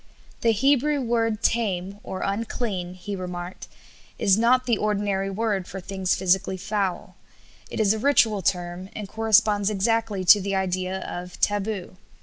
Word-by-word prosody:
"The 230 - +2
Hebrew 280 +5 +2
word 230 -3 0
tame 200 -4 0
(unclean)," 195 -2 -3
he 200 +2 -6
remarked, 180 -1 -6 0.5
"is 195 - +4
not 245 +3 +3
the 235 -4 +1
ordinary 200 -2 0
word 200 -2 -1
for 190 - -6
things 190 0 -1
physically 190 +1 +1
foul; 195 -1 -2 0.6
it - - -5
is 210 -1 +4
a 220 - -3
ritual 225 -6 +3
term, 180 +1 -2
and 210 -2 -5
corresponds 215 -1 +3
exactly 215 -1 0
to 205 +3 +8
the 195 +1 -2
idea 185 0 -1
of 180 0 -7
taboo. 205 -3 -1
200 Hz, 140 wpm, -24 LUFS, 185-220 Hz, 0.6 s, to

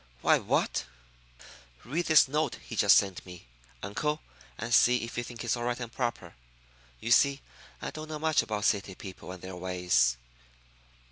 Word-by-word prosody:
"Why, - - +5
what - - 0 0.5
" - - -20
"Read 160 +8 -2
this 155 -3 +6
note 150 +3 -1
he 115 - -9
just 100 -2 +6
sent 95 -3 0
me, 90 -5 -12 0.4
uncle, 150 +10 -2 0.3
and 115 +1 -4
see 125 0 +5
if 115 - -7
you 120 - -2
think 120 0 -8
it's 120 0 0
all 120 0 -4
right 120 0 -1
and 120 -2 -6
proper. 120 -2 -3 0.7
You 115 - -4
see, 140 +3 +4 0.4
I - - -3
don't 155 0 -8
know 155 - -4
much 155 0 +2
about 105 -2 -3
city 100 -2 0
people 95 -2 -9
and 90 -1 -10
their 95 0 -7
ways." 90 -9 +1
115 Hz, 180 wpm, -29 LUFS, 95-130 Hz, 0.7 s, this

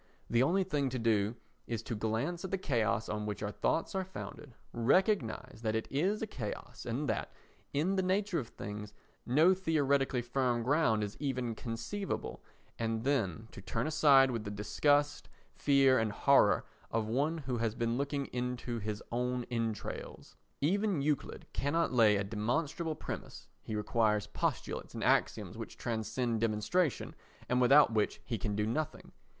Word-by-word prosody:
The 120 - +4
only 180 +9 +3
thing 145 -7 0
to 130 - -3
do 110 -2 +1 0.3
is 115 -1 -3
to - - -4
glance 115 - -1
at 190 - -4
the 195 - 0
chaos 110 - 0
on 105 0 -3
which 105 0 -4
our 105 - -2
thoughts 165 - 0
are 190 -1 0
founded, 150 -8 -9 0.2
recognise 130 - +1
that 110 -1 0
it 110 - -1
is 190 +10 +1
a - - +1
chaos 125 - -6
and - - -2
that, - - -2 0.4
in 170 +7 +1
the - - +3
nature 190 0 +1
of 120 - -5
things, 105 -1 -7 0.3
no 155 +9 +5
theoretically 140 -8 +1
firm 120 -1 0
ground 125 -5 +2
is 105 +1 -5
even 125 -5 -1
conceivable, 115 - -4 0.4
and 115 -1 -1
then 115 - 0
to - - -10
turn 115 +6 -2
aside 145 -4 +5
with 115 -3 -3
the 105 - -5
disgust, 145 +8 +1 0.2
fear 135 -3 +4
and 110 -1 0
horror - - +4 0.2
of 110 -1 0
one 140 +9 0
who 130 -6 -3
has 115 -1 0
been 115 0 0
looking 140 +1 -1
into 125 -1 -2
his 105 0 -4
own 125 +1 -1
entrails. 115 -3 -4 0.3
Even 190 0 +1
Euclid 150 -2 -1
cannot 150 +2 0
lay 110 -4 +6
a 100 - +1
demonstrable 140 - -1
premise, - - -7
he 110 - -5
requires 105 -1 +1
postulates - - -3
and - - -3
axioms - - +1
which - - -7
transcend 115 0 -1
demonstration 115 - 0 0.3
and 125 0 +2
without 135 0 +6
which 105 -2 +1
he 115 - -3
can 105 +1 -2
do 105 0 +1
nothing. 150 +8 -3
125 Hz, 165 wpm, -32 LUFS, 110-150 Hz, 0.4 s, lay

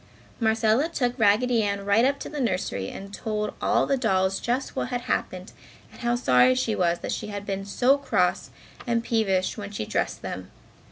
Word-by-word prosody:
Marcella 225 +5 +2
took 245 -7 0
Raggedy 230 +3 +3
Ann 200 -1 -2
right 205 +3 +4
up 280 +1 +2
to - - -5
the 295 -2 -4
nursery 180 - -1
and 200 +1 -9
told 210 0 -3
all - - +2
the 275 - +1
dolls 190 -4 +1
just 250 +3 -2
what - - -1
had 245 -1 -3
happened 185 -5 -3 0.4
and - - -14
how 240 0 +1
sorry 185 - +4
she 255 -3 0
was 175 -3 +1
that - - -4
she - - -3
had 205 -1 -6
been 195 -1 -3
so 255 +7 +3
cross 280 - 0 0.4
and 235 -1 +1
peevish 210 -4 0
when 205 -1 -6
she 200 - -4
dressed - - -2
them. 90 0 -6
215 Hz, 190 wpm, -25 LUFS, 195-245 Hz, 0.4 s, right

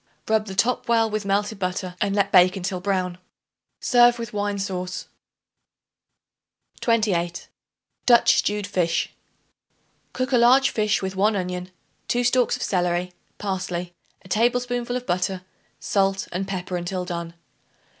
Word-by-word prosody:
Rub 220 -1 +1
the 190 - -6
top 240 +6 +1
well 225 -1 +4
with 215 -1 -2
melted 205 +1 0
butter 185 -1 -3
and 200 0 +1
let 200 -1 +1
bake 180 -1 +6
until 185 0 -3
brown. 185 -2 -1 0.6
Serve 240 -1 +5
with 230 -2 -6
wine 205 0 -1
sauce. 185 -2 -4 1.7
28. 190 -7 0 0.6
Dutch 240 -1 +6
Stewed 210 0 0
Fish. 180 -4 0 1.0
Cook 255 +1 -2
a 250 - +4
large 255 +3 +5
fish 215 -2 0
with 190 0 -3
1 210 +3 +2
onion, 180 -1 -3 0.4
2 245 0 +1
stalks 245 0 +2
of - - -5
celery, 180 -1 0 0.2
parsley, 185 -3 -3 0.3
a - - -14
tablespoonful 245 +3 0
of 250 - -7
butter, 185 0 -1 0.4
salt 195 -1 0
and 190 +2 -3
pepper 185 -2 -3
until 180 +1 -3
done. 170 -1 -5
195 Hz, 135 wpm, -23 LUFS, 180-225 Hz, 1.7 s, bake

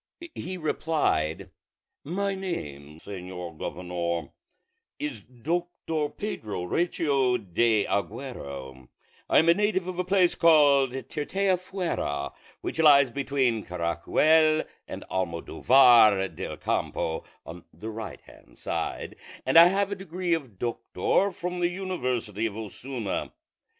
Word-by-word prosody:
He 185 +2 -5
replied, 150 - -1 0.5
"My 195 +6 -1
name, 75 - -6
señor 90 -3 -7
governor, 85 -3 -3 0.7
is 145 -8 -4
Doctor 155 - -3
Pedro 110 - -5
Recio 140 - +1
de 110 +1 +1
Aguero; 70 - -5 0.4
I - - +4
am 160 - +5
a 170 - +8
native 205 -1 0
of 185 -1 -5
a - - +2
place 185 -1 +3
called 145 -5 +5
Tirteafuera, 180 - -2 0.3
which - - -5
lies 140 -4 +6
between 135 -4 0
Caracuel 155 - +2 0.2
and - - -7
Almodóvar 100 +3 +4
del - - -5
Campo, 80 0 -2 0.2
on 85 +2 -9
the 110 +8 -7
right 110 0 -7
hand - - -19
side; - - -4 0.3
and - - 0
I 165 +1 +10
have 195 +2 +1
the 200 - -2
degree 185 -2 -2
of 135 - -3
doctor 120 - 0
from 180 0 -4
the 175 0 +2
university 125 - -2
of 105 -1 -7
Osuna." 110 0 -5
135 Hz, 115 wpm, -27 LUFS, -, 0.7 s, I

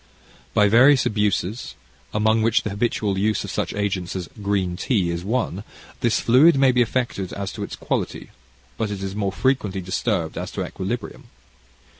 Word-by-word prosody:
By 105 - +5
various 130 +5 +6
abuses, 105 +1 -1 0.4
among 110 +1 +2
which 115 +1 +2
the 105 - -3
habitual 100 -2 -1
use 105 0 +1
of - - -6
such - - -2
agents 95 -4 -2
as 90 -2 -4
green 100 -3 0
tea 95 -4 0
is 85 0 -4
one, 105 -3 -1 0.4
this 120 -2 +2
fluid 135 +6 +5
may 135 -1 +5
be 125 0 +3
affected 115 -5 -1
as 100 -1 -4
to - - -7
its - - -5
quality, - - -3 0.5
but 110 -2 0
it 100 -1 -5
is 95 0 -4
more 100 -2 -1
frequently 105 -4 0
disturbed 95 0 -2
as - - -4
to - - -2
equilibrium. 105 +5 -5
105 Hz, 170 wpm, -23 LUFS, 95-120 Hz, 0.5 s, various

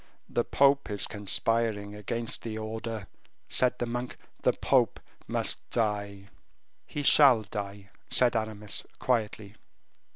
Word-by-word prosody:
"The 120 - 0
pope 140 +1 +3
is 100 -2 +1
conspiring 105 0 +1
against 115 +3 -2
the 110 -2 -5
order," 110 -1 -5 0.4
said 125 -1 +2
the 120 - -2
monk; 120 +1 -4 0.2
"the - - +3
pope - - +2 0.3
must - - -1
die." 100 -3 -2 0.6
"He 145 - -4
shall 135 -6 +7
die," 100 0 -7 0.2
said 125 -1 +3
Aramis, 110 -2 -2
quietly. 110 -4 -1
110 Hz, 120 wpm, -28 LUFS, 105-120 Hz, 0.6 s, shall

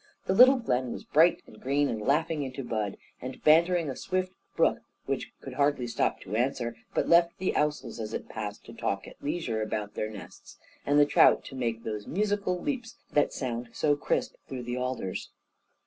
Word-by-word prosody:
The 190 - +1
little 255 +6 +8
glen 130 - -1
was - - -6
bright, 170 +3 +4
and 110 - -16
green, 140 +2 +2
and 110 -4 -3
laughing 150 +5 +1
into 135 0 -4
bud, 110 -4 -2 0.2
and 130 +1 -6
bantering 170 +2 +5
a 135 - -3
swift 185 +4 -2 0.2
brook, - - +3 0.3
which - - -3
could - - -8
hardly 140 -3 +1
stop 120 -1 0
to 100 +3 -5
answer, 120 -1 0 0.2
but - - +1
left 170 0 +5
the 185 - 0
ousels 150 -4 -1
as 110 -1 -4
it - - -4
passed 105 -2 -6
to - - -11
talk - - -2
at - - -14
leisure 145 -8 -2
about 105 -1 -3
their 110 - -2
nests, 105 -2 -11 0.3
and 145 +1 +4
the 145 - +7
trout - - +5
to 135 - -9
make 115 -3 -2
those 105 -2 -4
musical 200 -1 0
leaps 245 -1 -4
that 145 - +3
sound 120 -2 -4
so 145 -1 +2
crisp 145 - -1
through 130 -2 -5
the 120 +1 -3
alders. 125 -7 -3
135 Hz, 195 wpm, -28 LUFS, 115-170 Hz, 0.3 s, little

